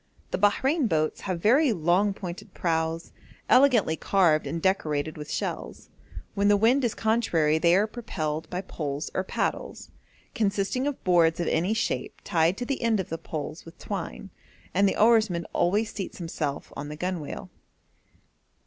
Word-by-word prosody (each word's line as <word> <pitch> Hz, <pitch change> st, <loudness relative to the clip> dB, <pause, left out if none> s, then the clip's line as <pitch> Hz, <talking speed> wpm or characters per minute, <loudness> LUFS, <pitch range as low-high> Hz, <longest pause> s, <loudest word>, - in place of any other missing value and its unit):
The -, -, -1 dB
Bahrein 260 Hz, -, +2 dB
boats 155 Hz, -4 st, 0 dB
have 185 Hz, -3 st, -3 dB
very 265 Hz, +5 st, +5 dB
long 180 Hz, +2 st, +2 dB
pointed 190 Hz, +2 st, -8 dB
prows, 165 Hz, -1 st, -1 dB, 0.4 s
elegantly 245 Hz, -, +4 dB
carved 165 Hz, -3 st, +2 dB
and 165 Hz, -, -3 dB
decorated 155 Hz, -5 st, 0 dB
with 150 Hz, -1 st, -8 dB
shells; -, -, -4 dB, 0.4 s
when 200 Hz, -1 st, +1 dB
the 205 Hz, 0 st, +5 dB
wind 240 Hz, +6 st, +3 dB
is 235 Hz, -, 0 dB
contrary 175 Hz, -9 st, +2 dB
they 170 Hz, +2 st, +4 dB
are 200 Hz, +3 st, +4 dB
propelled 160 Hz, -9 st, -4 dB
by 180 Hz, -, -3 dB
poles 150 Hz, -5 st, -5 dB
or 190 Hz, -, 0 dB
paddles, -, -, -3 dB, 0.4 s
consisting 210 Hz, +4 st, 0 dB
of 290 Hz, -, -4 dB
boards 170 Hz, -3 st, +3 dB
of 170 Hz, -, 0 dB
any 180 Hz, +7 st, +1 dB
shape 225 Hz, -, -2 dB
tied 165 Hz, +2 st, +2 dB
to 245 Hz, -, -3 dB
the 275 Hz, +1 st, -2 dB
end 230 Hz, -3 st, +2 dB
of 190 Hz, -, -3 dB
the 165 Hz, -, -4 dB
poles 155 Hz, 0 st, -6 dB
with 165 Hz, -, -14 dB
twine, -, -, -6 dB, 0.4 s
and 195 Hz, +2 st, +4 dB
the -, -, -3 dB
oarsman 215 Hz, -7 st, +3 dB
always 210 Hz, +5 st, +1 dB
seats 195 Hz, -4 st, -6 dB
himself 160 Hz, -5 st, -4 dB
on 145 Hz, -, -6 dB
the 150 Hz, -, -7 dB
gunwale. 180 Hz, -3 st, -4 dB
185 Hz, 160 wpm, -26 LUFS, 160-215 Hz, 0.4 s, very